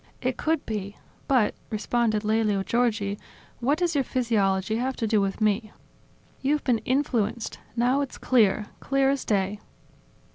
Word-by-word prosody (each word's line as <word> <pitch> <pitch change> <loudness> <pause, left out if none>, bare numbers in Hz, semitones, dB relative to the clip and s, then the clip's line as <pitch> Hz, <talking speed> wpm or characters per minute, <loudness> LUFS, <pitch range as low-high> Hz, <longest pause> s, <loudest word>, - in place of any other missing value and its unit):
"It 255 -1 -1
could 315 +1 0
be. 205 -2 -4 0.3
But," 250 -6 +3 0.2
responded 215 0 0
Lelio 215 -2 +1
Giorgi, 215 -3 0 0.4
"what 275 +5 +2
does 350 -1 +1
your 280 -2 +2
physiology 215 -5 +1
have 260 +2 -1
to 230 - -2
do 215 -1 +2
with 195 0 -1
me?" 215 +1 +1 0.7
"You've 290 +2 +1
been 240 -4 +2
influenced; 235 -3 -1 0.2
now 250 +4 +2
it's 275 - -4
clear, 215 -4 +3
clear 270 0 +2
as 275 - -1
day." 200 0 0
230 Hz, 145 wpm, -26 LUFS, 210-260 Hz, 0.7 s, But